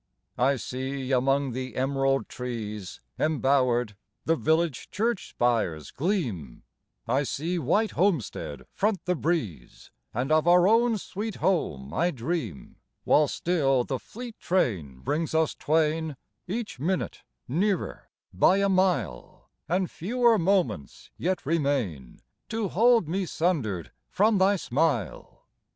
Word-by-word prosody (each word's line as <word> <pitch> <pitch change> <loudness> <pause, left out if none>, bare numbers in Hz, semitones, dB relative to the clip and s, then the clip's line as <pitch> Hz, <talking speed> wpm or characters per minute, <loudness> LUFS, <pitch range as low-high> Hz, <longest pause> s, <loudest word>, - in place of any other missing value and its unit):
I 135 +3 +4
see 130 +1 -4
among 135 +1 +2
the 130 -1 -5
emerald 135 +1 +1
trees 105 -6 -6 0.2
Embowered, 130 -7 +2 0.3
the 165 - +3
village 160 -2 0
church 225 +1 -1
spires 110 - 0
gleam; 130 - -2 0.4
I 130 +4 +2
see 165 +5 -2
white 205 - +1
homestead 160 - -1
front 205 -3 0
the 180 - +2
breeze, 140 - -3 0.2
And 130 +5 -2
of 155 +1 +3
our 175 +1 +6
own 230 +1 +4
sweet 210 +2 -5
home 75 - -1
I 175 +2 +2
dream; 125 - -4 0.3
While 150 0 +4
still 135 -6 +1
the 130 +1 -3
fleet 230 - -9
train 90 - -1
brings 160 - -1
us 160 -1 +2
twain 155 -1 0 0.3
Each 210 - -4
minute 180 +6 -2 0.3
nearer 185 +7 -1 0.2
by 140 - +4
a 200 0 +2
mile, 180 - -1 0.2
And 180 +1 0
fewer 235 +4 +2
moments 180 - 0
yet 185 -1 -2
remain 135 - -1 0.3
To 220 -3 -2
hold 230 -1 +4
me 185 +3 -1
sundered 130 - -1 0.2
from 210 0 +3
thy 195 +2 +4
smile. 145 - -2
155 Hz, 125 wpm, -27 LUFS, 125-185 Hz, 0.4 s, our